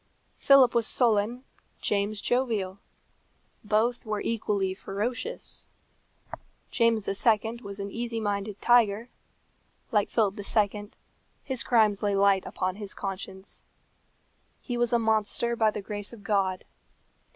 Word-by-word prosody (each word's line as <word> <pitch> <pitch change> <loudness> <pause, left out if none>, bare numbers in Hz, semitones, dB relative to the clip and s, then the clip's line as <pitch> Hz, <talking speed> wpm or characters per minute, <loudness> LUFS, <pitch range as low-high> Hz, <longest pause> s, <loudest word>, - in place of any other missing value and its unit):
Philip 275 -3 +6
was 235 -2 +3
sullen, 235 +1 +2 0.4
James 205 0 -1
jovial. 220 -7 0 0.8
Both 220 +3 +1
were 215 -2 -2
equally 205 -4 -1
ferocious. 235 - -4 1.0
James 230 -3 +2
II. 220 +3 +1
was 200 -2 -7
an 200 0 -5
easy 230 0 -3
minded 205 -1 -3
tiger; 235 -1 +3 0.8
like 210 -3 +2
Philip 210 -3 +1
II., 205 0 0 0.5
his 260 -3 -2
crimes 215 -4 +3
lay 205 -1 +1
light 195 -1 +3
upon 185 +1 -3
his 205 -2 -7
conscience. 190 0 -6 1.0
He 245 - -5
was 240 -1 +1
a 240 - +4
monster 220 +1 +1
by 220 -2 +3
the 210 -1 -5
grace 205 +1 -5
of 215 -3 -12
God. 195 -4 0
210 Hz, 120 wpm, -27 LUFS, 200-235 Hz, 1.0 s, Philip